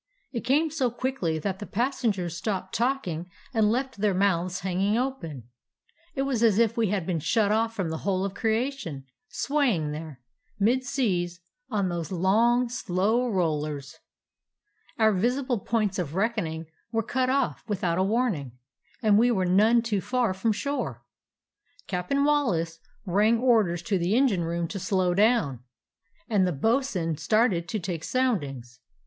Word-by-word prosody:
It 235 Hz, -, -3 dB
came 295 Hz, +6 st, +2 dB
so 275 Hz, -5 st, +1 dB
quickly 235 Hz, -9 st, -2 dB
that 190 Hz, +4 st, -3 dB
the 205 Hz, -, -7 dB
pas 250 Hz, +7 st, -1 dB
sengers 195 Hz, -8 st, 0 dB
stopped 190 Hz, +2 st, -3 dB
talking 205 Hz, -10 st, -1 dB, 0.2 s
and 220 Hz, -3 st, +3 dB
left 260 Hz, +1 st, -2 dB
their 205 Hz, -2 st, +2 dB
mouths 185 Hz, -2 st, +1 dB
hanging 190 Hz, +3 st, 0 dB
open. 195 Hz, -, -3 dB, 0.7 s
It 270 Hz, -, 0 dB
was 270 Hz, -5 st, -1 dB
as 220 Hz, -4 st, +4 dB
if 230 Hz, -1 st, +3 dB
we 230 Hz, -2 st, +2 dB
had 195 Hz, -3 st, -1 dB
been 170 Hz, -2 st, -1 dB
shut 210 Hz, +6 st, +2 dB
off 225 Hz, +1 st, +1 dB
from 190 Hz, -6 st, -2 dB
the 160 Hz, 0 st, -3 dB
whole 190 Hz, -1 st, 0 dB
of 195 Hz, -, -4 dB
creation, 220 Hz, -, -2 dB, 0.2 s
swaying 245 Hz, -, 0 dB
there, 150 Hz, -3 st, -7 dB, 0.4 s
mid 240 Hz, +6 st, +2 dB
seas, 185 Hz, -10 st, -1 dB, 0.3 s
on 200 Hz, -6 st, 0 dB
those 170 Hz, -2 st, -4 dB
long, 225 Hz, +7 st, +3 dB
slow 230 Hz, +1 st, 0 dB
rollers. 150 Hz, -7 st, -2 dB, 1.0 s
"Our 220 Hz, -2 st, +4 dB
visible 245 Hz, +5 st, 0 dB
points 210 Hz, -2 st, -1 dB
of 160 Hz, -3 st, -3 dB
reckoning 190 Hz, -6 st, -1 dB, 0.3 s
were 225 Hz, -1 st, 0 dB
cut 255 Hz, +3 st, 0 dB
off 260 Hz, -, 0 dB
without 180 Hz, -5 st, 0 dB
a -, -, +3 dB
warning, 195 Hz, -, 0 dB, 0.5 s
and 210 Hz, -1 st, +5 dB
we 240 Hz, +2 st, +4 dB
were 190 Hz, -6 st, +1 dB
none 215 Hz, +6 st, +4 dB
too 210 Hz, -4 st, -1 dB
far 245 Hz, -4 st, 0 dB
from 205 Hz, +4 st, 0 dB
shore. 215 Hz, -, -3 dB, 0.8 s
Cap'n 180 Hz, +11 st, -1 dB
Wallace 180 Hz, -, +1 dB, 0.3 s
rang 210 Hz, +5 st, +3 dB
or 240 Hz, -2 st, +4 dB
ders 170 Hz, -1 st, -4 dB
to 200 Hz, -5 st, 0 dB
the 175 Hz, +5 st, +1 dB
engine 230 Hz, -10 st, +2 dB
room 170 Hz, 0 st, -2 dB
to 200 Hz, -, -4 dB
slow 185 Hz, -1 st, +1 dB
down, 205 Hz, -, +2 dB, 0.7 s
and 200 Hz, -4 st, +2 dB
the -, -, 0 dB
bo'sun 180 Hz, -, 0 dB
started 190 Hz, 0 st, +2 dB
to 215 Hz, -, -1 dB
take 170 Hz, -3 st, -4 dB
soundings. 145 Hz, -, -1 dB
205 Hz, 160 wpm, -26 LUFS, 175-240 Hz, 1.0 s, and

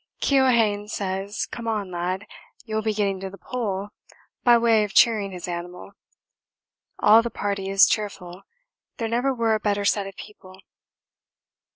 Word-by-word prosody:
Keohane 235 Hz, -7 st, +2 dB
says 195 Hz, 0 st, -3 dB
'Come 230 Hz, -1 st, -8 dB
on, 210 Hz, -4 st, -2 dB
lad, 180 Hz, +3 st, -3 dB, 0.4 s
you'll 220 Hz, -1 st, -2 dB
be 220 Hz, 0 st, 0 dB
getting 200 Hz, -2 st, -1 dB
to 190 Hz, 0 st, -5 dB
the 195 Hz, -, -12 dB
Pole' 205 Hz, -1 st, -4 dB, 0.5 s
by 240 Hz, -1 st, +6 dB
way 230 Hz, -2 st, +3 dB
of 205 Hz, -2 st, -6 dB
cheering 215 Hz, -4 st, +4 dB
his 180 Hz, -1 st, -7 dB
animal 175 Hz, +2 st, -7 dB, 1.1 s
all 220 Hz, +2 st, +6 dB
the 235 Hz, -, -4 dB
party 200 Hz, -3 st, -3 dB
is 195 Hz, 0 st, +6 dB
cheerful, 195 Hz, -4 st, -3 dB, 0.6 s
there 230 Hz, -, -2 dB
never 245 Hz, +4 st, 0 dB
were 230 Hz, -3 st, +1 dB
a 215 Hz, -, +1 dB
better 205 Hz, -1 st, -1 dB
set 200 Hz, -1 st, +1 dB
of 195 Hz, -, -10 dB
people. 190 Hz, -3 st, -13 dB
205 Hz, 155 wpm, -24 LUFS, 195-225 Hz, 1.1 s, by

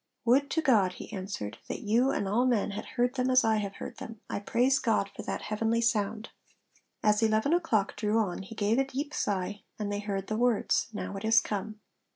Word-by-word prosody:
'Would 270 Hz, +4 st, +4 dB
to 320 Hz, -, 0 dB
God,' 210 Hz, -10 st, +4 dB
he -, -, -10 dB
answered, 185 Hz, -, -5 dB
'that -, -, -4 dB
you 230 Hz, +5 st, +2 dB
and 200 Hz, -, -1 dB
all 235 Hz, +6 st, +2 dB
men 225 Hz, -5 st, +1 dB
had 205 Hz, -, -5 dB
heard 245 Hz, +1 st, +2 dB
them 255 Hz, -1 st, 0 dB
as 255 Hz, 0 st, +5 dB
I 220 Hz, -1 st, +3 dB
have 200 Hz, -2 st, -3 dB
heard -, -, -8 dB
them; 225 Hz, -1 st, -8 dB
I -, -, -1 dB
praise 250 Hz, +6 st, +2 dB
God 215 Hz, -4 st, +1 dB
for -, -, -6 dB
that -, -, -4 dB
heavenly 225 Hz, +2 st, 0 dB
sound.' 220 Hz, -1 st, 0 dB, 0.7 s
As 210 Hz, 0 st, +3 dB
eleven 220 Hz, +6 st, +2 dB
o'clock 285 Hz, -, +1 dB
drew 210 Hz, +1 st, 0 dB
on 195 Hz, -5 st, 0 dB
he 195 Hz, +4 st, -10 dB
gave 215 Hz, +4 st, +1 dB
a -, -, +4 dB
deep 275 Hz, +2 st, -4 dB
sigh, 200 Hz, -2 st, -2 dB, 0.2 s
and 210 Hz, -1 st, -3 dB
they 205 Hz, -, -2 dB
heard 200 Hz, -2 st, -3 dB
the 215 Hz, -, -2 dB
words, 240 Hz, -2 st, +2 dB
'Now 210 Hz, -2 st, -5 dB
it 195 Hz, -, -7 dB
is 225 Hz, +1 st, +6 dB
come.' 215 Hz, 0 st, -4 dB
220 Hz, 215 wpm, -29 LUFS, 205-245 Hz, 0.7 s, is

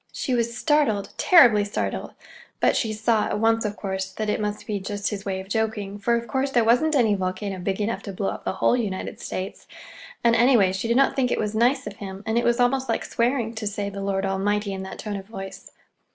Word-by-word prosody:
She 260 Hz, -, -2 dB
was 235 Hz, 0 st, 0 dB
startled, 290 Hz, -11 st, +1 dB
terribly 245 Hz, -, +6 dB
startled; 205 Hz, -, -3 dB, 0.5 s
but -, -, +3 dB
she 225 Hz, -, 0 dB
saw 220 Hz, 0 st, +1 dB
at -, -, -2 dB
once, 225 Hz, 0 st, +2 dB
of 210 Hz, 0 st, -3 dB
course, 190 Hz, -1 st, -3 dB
that 215 Hz, +1 st, -2 dB
it -, -, -1 dB
must 210 Hz, 0 st, -3 dB
be 210 Hz, -3 st, -2 dB
just 205 Hz, +2 st, -3 dB
his 200 Hz, -1 st, -5 dB
way 190 Hz, -1 st, -2 dB
of 190 Hz, -, -8 dB
joking, 210 Hz, -2 st, -2 dB
for 235 Hz, +4 st, +2 dB
of 235 Hz, 0 st, -3 dB
course 265 Hz, +5 st, 0 dB
there 245 Hz, -3 st, +3 dB
wasn't 250 Hz, +8 st, +3 dB
any 230 Hz, -6 st, +4 dB
volcano 190 Hz, 0 st, -3 dB
big 190 Hz, +2 st, -2 dB
enough 210 Hz, +2 st, -1 dB
to 200 Hz, -, -6 dB
blow 195 Hz, +1 st, -2 dB
up -, -, -6 dB
the -, -, -2 dB
whole 190 Hz, -, +2 dB
United 210 Hz, -6 st, -3 dB
States; 190 Hz, +2 st, -6 dB, 0.6 s
and, 235 Hz, -1 st, +5 dB
anyway, 230 Hz, -5 st, +5 dB
she 190 Hz, +4 st, -3 dB
did 235 Hz, +1 st, +2 dB
not 275 Hz, -, +3 dB
think 255 Hz, -2 st, +1 dB
it -, -, 0 dB
was 210 Hz, 0 st, -2 dB
nice 250 Hz, +4 st, +2 dB
of 200 Hz, -, -7 dB
him, 195 Hz, 0 st, -8 dB
and 220 Hz, 0 st, -1 dB
it -, -, -1 dB
was 240 Hz, +1 st, +2 dB
almost 260 Hz, +2 st, +2 dB
like -, -, -1 dB
swearing, 235 Hz, -1 st, 0 dB
to 220 Hz, -2 st, -4 dB
say 205 Hz, 0 st, -3 dB
"the 200 Hz, 0 st, -6 dB
Lord 195 Hz, 0 st, -1 dB
Almighty" 200 Hz, +1 st, 0 dB
in 190 Hz, -, -5 dB
that 190 Hz, 0 st, -7 dB
tone 210 Hz, -2 st, -4 dB
of 195 Hz, 0 st, -9 dB
voice. 195 Hz, -3 st, -9 dB
215 Hz, 240 wpm, -24 LUFS, 195-235 Hz, 0.6 s, terribly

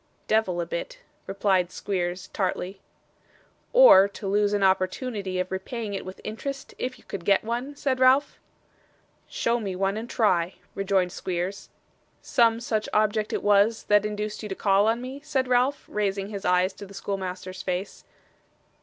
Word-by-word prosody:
'Devil 215 Hz, -5 st, +1 dB
a 170 Hz, -, -1 dB
bit,' 170 Hz, 0 st, -5 dB, 0.3 s
replied 190 Hz, -2 st, +1 dB
Squeers, 180 Hz, -2 st, -3 dB
tartly. 190 Hz, -1 st, -3 dB, 0.9 s
'Or 485 Hz, -, +8 dB
to 200 Hz, 0 st, -8 dB
lose 205 Hz, +1 st, +2 dB
an 205 Hz, -1 st, +1 dB
opportunity 190 Hz, +1 st, 0 dB
of 185 Hz, 0 st, -2 dB
repaying 205 Hz, +3 st, -4 dB
it 195 Hz, -, -4 dB
with 185 Hz, 0 st, -9 dB
interest, 275 Hz, +6 st, -6 dB
if 255 Hz, +1 st, -3 dB
you -, -, -20 dB
could 195 Hz, -3 st, -7 dB
get 195 Hz, +2 st, +3 dB
one?' 240 Hz, +6 st, -3 dB
said 265 Hz, -2 st, -1 dB
Ralph. 260 Hz, +3 st, +4 dB, 0.9 s
'Show 235 Hz, +1 st, 0 dB
me 195 Hz, -4 st, -4 dB
one, 195 Hz, +2 st, 0 dB
and 230 Hz, +2 st, -6 dB
try,' 180 Hz, -5 st, +1 dB, 0.2 s
rejoined 195 Hz, -2 st, +1 dB
Squeers. 185 Hz, +2 st, -4 dB, 0.5 s
'Some 230 Hz, -1 st, +2 dB
such 220 Hz, -2 st, -2 dB
object 215 Hz, 0 st, +1 dB
it -, -, -2 dB
was, 205 Hz, +2 st, +3 dB
that 205 Hz, -1 st, +5 dB
induced 210 Hz, 0 st, -4 dB
you 210 Hz, -, -6 dB
to 190 Hz, -, -3 dB
call 200 Hz, +1 st, +3 dB
on 230 Hz, +2 st, +1 dB
me?' 265 Hz, +2 st, -7 dB
said 275 Hz, -4 st, -1 dB
Ralph, 250 Hz, +3 st, +1 dB
raising 200 Hz, -1 st, -2 dB
his 200 Hz, -2 st, -6 dB
eyes 180 Hz, +1 st, +3 dB
to 200 Hz, -, -10 dB
the 200 Hz, -, -13 dB
schoolmaster's 185 Hz, -1 st, -5 dB
face. 185 Hz, +1 st, -4 dB
200 Hz, 165 wpm, -26 LUFS, 190-230 Hz, 0.9 s, Or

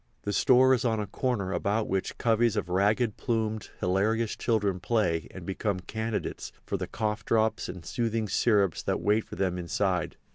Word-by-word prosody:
The 105 Hz, -, -2 dB
store 130 Hz, +3 st, +5 dB
is 125 Hz, -, +1 dB
on 115 Hz, -3 st, +1 dB
a 105 Hz, -, -1 dB
corner 100 Hz, -4 st, -2 dB
about 105 Hz, +2 st, 0 dB
which 95 Hz, 0 st, -2 dB
coveys 115 Hz, -1 st, +2 dB
of 100 Hz, -4 st, -2 dB
ragged 105 Hz, +4 st, +2 dB
plumed, 110 Hz, -3 st, -2 dB
hilarious 105 Hz, +5 st, +1 dB
children 105 Hz, -5 st, 0 dB
play 90 Hz, -6 st, 0 dB
and 90 Hz, -3 st, -10 dB
become 95 Hz, +1 st, -2 dB
candidates 110 Hz, +2 st, -4 dB
for -, -, -2 dB
the -, -, -3 dB
cough 105 Hz, -1 st, -2 dB
drops 110 Hz, -1 st, +1 dB
and 90 Hz, -2 st, -8 dB
soothing 115 Hz, -2 st, -1 dB
syrups 100 Hz, -, +2 dB
that -, -, -1 dB
wait 105 Hz, +2 st, +2 dB
for -, -, -9 dB
them 90 Hz, -1 st, -1 dB
inside. 90 Hz, +2 st, -1 dB
105 Hz, 175 wpm, -28 LUFS, 95-115 Hz, -, store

